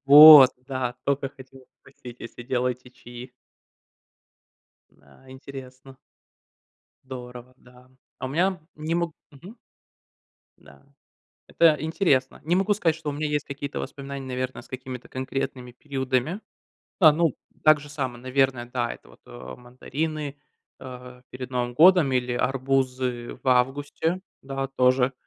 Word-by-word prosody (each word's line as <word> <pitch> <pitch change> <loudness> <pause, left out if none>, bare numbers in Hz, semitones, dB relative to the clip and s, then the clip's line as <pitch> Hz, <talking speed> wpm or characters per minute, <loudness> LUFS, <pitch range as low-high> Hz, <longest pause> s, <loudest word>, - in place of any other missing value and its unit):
Вот 145 -2 +11 0.2
да, 130 -2 -3
только 140 -1 0
хотела 130 -1 -16 0.2
спросить, 125 -3 -13
если 120 +1 -9
делаете 125 0 -2
чаи! 125 0 -12 1.6
Да. 70 - -23
Интересно. 130 0 -11 1.1
Здорово, 125 -1 -10
да. 125 0 -20 0.3
А 130 - -4
у - - -4
меня 180 +5 0 0.2
не 155 +2 -3
могу 170 -1 -1 0.2
Мгм. 175 - -14 1.0
Да. - - -19 0.7
Это 160 -2 +4
интересно. 155 -5 0
Не 165 +4 +1
могу 195 +2 +2
сказать, 165 -6 +1
что 160 -2 -5
у 145 - -4
меня 150 +1 -2
есть 150 -1 -1
какие-то 140 0 -6
воспоминания, 140 -2 -7
наверно, 130 0 -4
с - - -19
какими-то 130 -1 -8
конкретными 130 -1 -5
периодами. 135 - -2 0.6
А, 160 -5 +8
ну, 160 -2 +1 0.3
так 155 -1 +6
же 145 - -12
само, 130 -5 -4
наверно, 130 -1 0
да, 120 -2 -1
это - - -18
вот - - -20 0.4
мандарины, 145 +4 -5 0.4
э, 125 -1 -11
перед 130 -1 -8
Новым 120 -1 -2
годом 170 -1 +6
или 125 -1 0
арбузы 130 -1 -1
в - - -9
августе. 145 +7 +1 0.2
Да, 135 0 -4
тоже 130 0 +2
130 Hz, 130 wpm, -25 LUFS, 125-150 Hz, 1.6 s, Вот